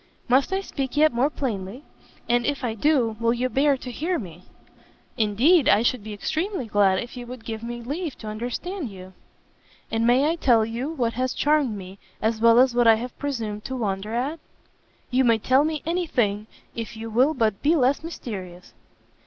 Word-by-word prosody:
"Must 260 +6 +3
I 385 0 0
speak 275 -7 -4
yet 310 -2 +5
more 250 +5 +2
plainly? 230 -3 -4 0.4
and 240 0 +2
if 285 +1 -2
I 235 -3 -1
do, 235 -2 +1
will 230 +1 +2
you 250 +1 -1
bear 275 +1 +2
to 255 -1 -8
hear 335 +8 -1
me?" 180 - -9 0.7
"Indeed 260 - +3
I 220 - +5
should 240 -2 0
be 215 - -7
extremely 315 - -2
glad 205 -3 +3
if 240 +6 -5
you 245 -1 -7
would 245 -2 -9
give 220 -1 -5
me 240 0 -6
leave 300 +4 -4
to 220 - -9
understand 245 - -4
you." 190 -1 -11 0.8
"And 225 +1 +1
may 255 +4 +4
I 330 +2 0
tell 235 -8 +4
you 235 +5 -4
what 240 -7 -1
has 255 +1 -2
charmed 290 -7 +1
me, 190 0 -10 0.2
as 220 0 -1
well 230 0 +6
as 255 0 +5
what 240 -1 +3
I 225 - +8
have 240 +2 -6
presumed 225 -7 -3
to 260 - -4
wonder 210 -2 -3
at?" 280 +7 -2 0.7
"You 255 +1 +3
may 230 -2 +4
tell 260 +5 +3
me 310 -1 -2
any 345 +1 -1
thing, 210 -5 0 0.3
if 230 -1 -6
you 225 0 -6
will 260 +8 +3
but 220 -5 0
be 310 +4 +3
less 275 +1 +2
mysterious." 190 - -8
240 Hz, 195 wpm, -24 LUFS, 220-285 Hz, 0.8 s, I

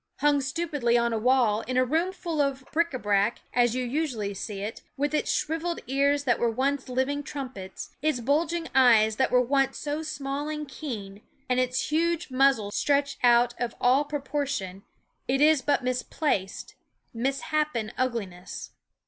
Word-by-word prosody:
Hung 290 -1 +3
stupidly 275 -4 0
on 235 0 +1
a 225 - 0
wall, 235 -3 +3
in 255 0 -1
a 255 - +4
room 325 +8 +1
full 340 -5 -2
of 275 -2 -1
bric 335 +2 +1
a 260 - -3
brac, 205 0 +1
as 240 -1 +3
you 255 - -1
usually 240 -7 -2
see 195 0 -5
it, 215 +3 -5 0.2
with 290 +2 -1
its 305 - +1
shriveled 330 +2 -1
ears 280 +2 +2
that 245 -4 +1
were 235 - +2
once 265 +3 -1
living 260 +3 0
trumpets, 260 -10 -7
its 305 -4 +1
bulging 325 +6 0
eyes 225 -4 +5
that 265 - +2
were 250 - +4
once 270 +2 +1
so 295 +1 -3
small 285 -1 -4
and 300 -1 -4
keen, 210 -9 -7 0.3
and 250 0 +1
its 255 +2 0
huge 335 0 0
muzzle 255 -6 +3
stretched 280 +3 +1
out 240 0 +5
of 240 -1 -2
all 260 +4 +4
proportion, 275 -9 -3 0.5
it 270 +1 +1
is 300 -1 +5
but 285 -2 +1
misplaced, 250 -4 -2 0.4
misshapen 270 -1 -1
ugliness. 210 -8 -4
265 Hz, 165 wpm, -27 LUFS, 235-295 Hz, 0.5 s, eyes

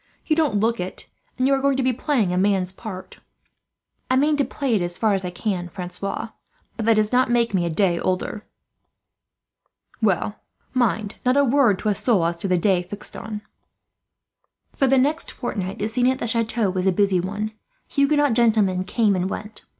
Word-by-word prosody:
You 310 - +2
don't 295 -10 +1
look 230 +2 +1
it, 180 +1 -5 0.3
and 255 - +1
you 275 - +4
are 270 - +2
going 275 -1 +2
to 260 -1 +1
play 260 0 +1
a 180 -2 -1
man's 190 -1 +1
part." 190 -1 -9 0.9
"I 255 - +3
mean 295 +3 +3
to 285 - +3
play 275 -2 -2
it 210 - +2
as 175 0 -1
far 220 -2 +2
as 195 -1 -1
I 180 - -3
can, 180 -1 -3
Francois; 190 +4 -5 0.5
but 225 -1 -3
that 225 - +5
does 215 0 +2
not 255 +1 +3
really 240 0 +2
make 230 -2 0
me 180 -3 +1
a - - -1
day 170 0 +1
older." 185 +3 -2 1.6
"Well, 205 0 +1 0.4
mind, 225 -4 0
not 255 +2 +2
a 285 - +5
word 250 -6 +3
to 215 - -1
a - - +3
soul 200 -4 +2
as 170 0 -1
to 180 - -3
the 185 -1 +2
day 185 0 +2
fixed 205 +4 -4
on." 210 0 -6 1.3
For 270 - +1
the 270 +1 +4
next 295 +5 +1
fortnight 195 -6 -4
the 210 - -1
scene 245 +3 +1
at 260 0 +2
the - - -4
chateau 225 -3 0
was 185 0 -1
a - - +5
busy 195 0 +2
one. 205 +4 -3 0.4
Huguenot 285 -1 +2
gentlemen 215 -6 +3
came 210 -1 +2
and 185 +1 -1
went. 210 +2 -6
215 Hz, 200 wpm, -23 LUFS, 190-250 Hz, 1.6 s, that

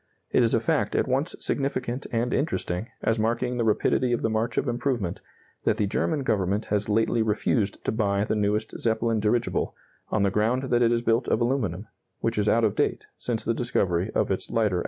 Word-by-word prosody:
It - - +4
is 115 -1 +3
a - - +3
fact 110 -2 0
at - - +2
once 135 +6 0
significant 135 -2 -2
and 120 +1 0
interesting, 110 - -1 0.2
as 115 0 +1
marking 120 +3 0
the 120 - +1
rapidity 120 +3 +2
of 120 - -1
the 115 - +1
march 110 +1 -1
of - - +1
improvement, 120 -7 -1 0.4
that 110 - +2
the 105 - +1
German 140 - 0
Government 100 -2 0
has 105 +1 0
lately 115 +2 +2
refused 105 -1 0
to - - +1
buy 100 -2 +1
the 110 - -1
newest 105 +1 -1
Zeppelin 115 0 +1
dirigible, 110 +3 0 0.3
on 105 - +1
the 100 - +2
ground 120 +6 0
that 120 0 +3
it 115 -1 +4
is 120 0 +1
built 115 +1 +2
of - - +2
aluminum, 115 -6 -1 0.3
which 115 -1 -1
is 105 - +2
out 115 - +3
of 110 - +3
date - - 0
since 115 -3 -3
the 115 - +1
discovery 95 -6 0
of - - +1
its 95 - -2
lighter 105 -5 +1
alloys. - - 0
115 Hz, 210 wpm, -26 LUFS, 105-120 Hz, 0.4 s, It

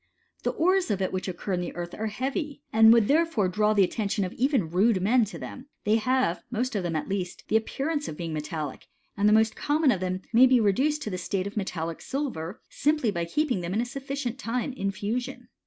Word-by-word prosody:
The - - 0
ores 370 +1 +2
of 205 -3 0
it 190 -1 -1
which 185 0 -2
occur 185 +2 -4
in 180 - 0
the 175 - -5
earth 175 0 -5
are 220 - -3
heavy, 275 - -3
and 220 0 +8
would 230 -3 +5
therefore 310 - +2
draw 210 +4 +2
the 200 - +6
attention 200 0 -1
of 180 - -6
even 255 - +1
rude 195 +3 +3
men 225 +5 +3
to 195 -5 -8
them: 255 - -8 0.2
they 215 +2 +3
have, 250 -6 +1
most 245 +1 -2
of 200 - +1
them 175 -2 -2
at 155 - -2
least, 190 -2 -3
the - - +1
appearance 290 +7 -1
of 150 - -6
being 165 -2 -4
metallic, 155 -2 -5 0.3
and 205 +1 +3
the - - +5
most 220 0 +3
common 295 -1 +2
of 195 - 0
them 185 0 -3
may 250 +3 +8
be 255 -1 +5
reduced 265 +9 +2
to 215 - -4
the 185 - -3
state 185 +1 -2
of 200 +3 -6
metallic 170 -5 -3
silver, 240 - -4
simply 300 -7 +1
by 170 -3 -2
keeping 250 - 0
them 175 +2 -3
a 235 +3 +1
sufficient 275 -1 -4
time 250 +3 -2
in 195 -6 -2
fusion. 210 +6 -4
215 Hz, 225 wpm, -27 LUFS, 185-260 Hz, 0.3 s, and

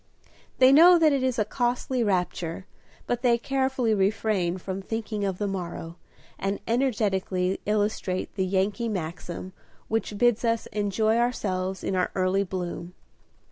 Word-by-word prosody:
They 260 0 +7
know 345 +5 +8
that 315 -3 +4
it 275 - +1
is 255 -2 0
a 215 - +2
costly 245 +2 -1
rapture, 180 -3 -1 0.4
but 245 0 -1
they 240 -2 +4
carefully 265 -2 0
refrain 195 -3 +1
from 190 +1 -5
thinking 215 0 -4
of 190 -2 -1
the 205 - -2
morrow, 175 -3 -5 0.4
and 195 +1 -2
energetically 200 -7 0
illustrate 205 -3 -1
the 190 -2 -1
Yankee 200 +5 0
maxim 180 -1 -5 0.4
which 220 -2 -1
bids 240 0 +3
us 230 -1 +1
enjoy 215 +1 +1
ourselves 190 -6 -1
in 190 - -1
our 180 -1 +1
early 190 +1 +2
bloom. 180 -1 -5
205 Hz, 140 wpm, -26 LUFS, 185-235 Hz, 0.4 s, know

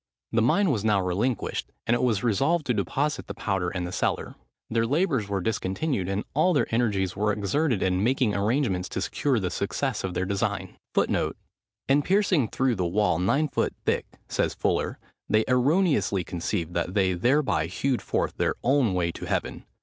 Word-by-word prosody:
The 115 - +2
mine 175 - +3
was 110 -6 -1
now 105 -2 +3
relinquished; 100 +7 -1
and 120 - +2
it 120 - +1
was 115 -5 +1
resolved 140 - +2
to 125 - +1
deposit 145 +6 -1
the - - -6
powder 90 -2 -1
in 90 -1 -3
the 90 - -4
cellar. - - -1 0.3
Their 115 0 0
labours 140 - +1
were 100 -1 -1
discontinued; 100 - -1
and 100 +2 -1
all 160 +6 +3
their 145 - +2
energies 100 -6 +1
were 105 +1 +1
exerted 105 - 0
in 95 +1 +1
making 125 -2 +2
arrangements 100 -3 0
to - - -3
secure 135 -5 0
the 90 -3 -2
success - - -2
of 95 -2 -3
their 90 - 0
design. 100 0 -2 0.2
[Footnote - - +1 0.5
9: 135 - +4
"In - - +2
piercing 185 - +2
through 130 +3 +1
the 90 - 0
wall 90 -2 +1
nine 140 +12 +2
foot - - -1
thick," - - 0 0.2
says - - -1
Fuller, - - 0 0.3
"they 110 +1 +3
erroneously 135 - +2
conceived 85 0 -3
that 90 - -2
they 95 -2 +3
thereby 105 - +2
hewed 135 +7 -1
forth - - -1
their - - +1
own 130 -7 +3
way 85 -2 +1
to - - -8
heaven. - - -2
110 Hz, 185 wpm, -26 LUFS, 95-135 Hz, 0.5 s, 9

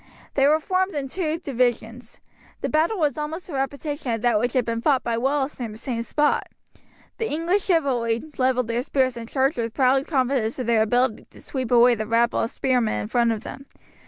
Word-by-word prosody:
They 275 0 +3
were 305 +2 +4
formed 375 +1 -1
in 280 -2 -2
two 320 +1 -2
divisions. 245 -4 -2 0.4
The - - -1
battle 320 +8 +1
was 305 -3 0
almost 320 +5 -5
a - - -7
repetition 280 0 -3
of 225 -1 -2
that 235 -3 +3
which 240 +2 -1
had 255 -3 +1
been 230 0 -2
fought 270 0 +2
by 235 - -1
Wallace 270 +4 -1
near 240 -2 -3
the 215 - -9
same 230 0 -3
spot. 295 +5 +1 0.7
The 450 - -1
English 340 +6 0
chivalry 250 - +1 0.2
levelled 255 -2 +2
their 235 +1 -1
spears 260 -1 0
and 230 -1 -8
charged 270 +2 +1
with 230 -1 -3
proud 265 0 +3
confidence 255 -5 0
of 255 - -3
their 230 -1 +3
ability 245 +1 +1
to - - -17
sweep 260 -4 -4
away 245 0 +6
the 215 -2 -3
rabble 235 +1 +2
of 225 - 0
spearmen 245 -4 0
in - - -5
front 235 -1 +2
of 220 0 -3
them. 275 - -9
255 Hz, 210 wpm, -23 LUFS, 235-290 Hz, 0.7 s, away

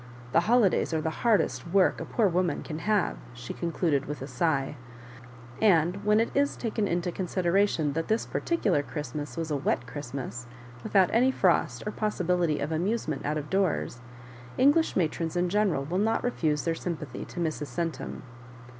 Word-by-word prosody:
The 165 - +5
holidays 200 -4 +3
are - - +1
the 160 - -1
hardest 215 -8 +2
work 190 +2 +3
a - - -4
poor 225 -4 +2
woman 175 -3 0
can 155 0 -5
have," 210 +1 +1 0.2
she 125 0 -7
concluded 165 -4 -1
with 150 -2 -5
a - - -6
sigh; 145 -5 0 0.9
and 185 -1 +3
when 210 +1 +4
it 230 - +1
is 285 0 +2
taken 220 -3 -1
into 175 0 -1
consideration 180 -3 +1
that 165 +2 -2
this 220 +1 +1
particular 205 - 0
Christmas 150 +1 -6
was 165 -1 -3
a - - +1
wet 135 -3 0
Christmas, 130 -3 -6 0.3
without 190 - +3
any 245 +4 +4
frost 175 - +1
or 210 - -2
possibility 180 -7 0
of 145 +3 -2
amusement 165 -2 -1
out 150 +1 0
of 150 -1 -6
doors, 185 -10 0 0.6
English 290 +5 +4
matrons 165 -1 -1
in 175 0 +1
general 195 -8 +1
will 175 +6 -1
not 220 +2 +1
refuse 155 -11 0
their 165 - +1
sympathy, 155 -6 -5
to - - -8
Mrs. 155 -3 -2
Centum. 165 +6 -4
170 Hz, 170 wpm, -28 LUFS, 150-205 Hz, 0.9 s, The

